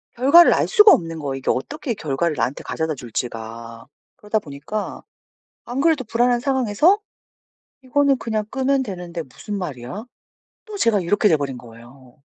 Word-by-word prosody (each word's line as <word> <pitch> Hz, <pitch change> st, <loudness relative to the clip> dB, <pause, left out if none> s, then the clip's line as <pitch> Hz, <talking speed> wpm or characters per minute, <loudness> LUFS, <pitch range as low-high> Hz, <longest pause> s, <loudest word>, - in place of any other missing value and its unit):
결과를 280 Hz, +8 st, +7 dB
알 -, -, +1 dB
수가 420 Hz, -3 st, +7 dB
없는 165 Hz, -, +1 dB
거예요. 140 Hz, -3 st, -3 dB
이게 135 Hz, -, -4 dB
어떻게 265 Hz, -, -3 dB
결과를 155 Hz, -1 st, -2 dB
나한테 130 Hz, -, -2 dB
가져다 160 Hz, -1 st, -3 dB
줄지가. 115 Hz, -1 st, -7 dB, 0.3 s
그러다 210 Hz, +1 st, -1 dB
보니까 150 Hz, +7 st, -6 dB, 0.6 s
안 250 Hz, +3 st, -4 dB
그래도 310 Hz, -4 st, +2 dB
불안한 240 Hz, +2 st, +1 dB
상황에서 265 Hz, -, +2 dB, 0.8 s
"이거는 275 Hz, +1 st, +2 dB
그냥 220 Hz, -2 st, -2 dB
끄면 270 Hz, 0 st, +1 dB
되는데 180 Hz, -6 st, -6 dB
무슨 200 Hz, -, -8 dB
말이야?" 155 Hz, -, -6 dB, 0.6 s
또 430 Hz, -2 st, -8 dB
제가 220 Hz, -, +2 dB
이렇게 205 Hz, +4 st, +2 dB
돼 160 Hz, -, +4 dB
버린 135 Hz, -3 st, -4 dB
거예요. 120 Hz, +3 st, -16 dB
200 Hz, 350 characters per minute, -21 LUFS, -, 0.8 s, 결과를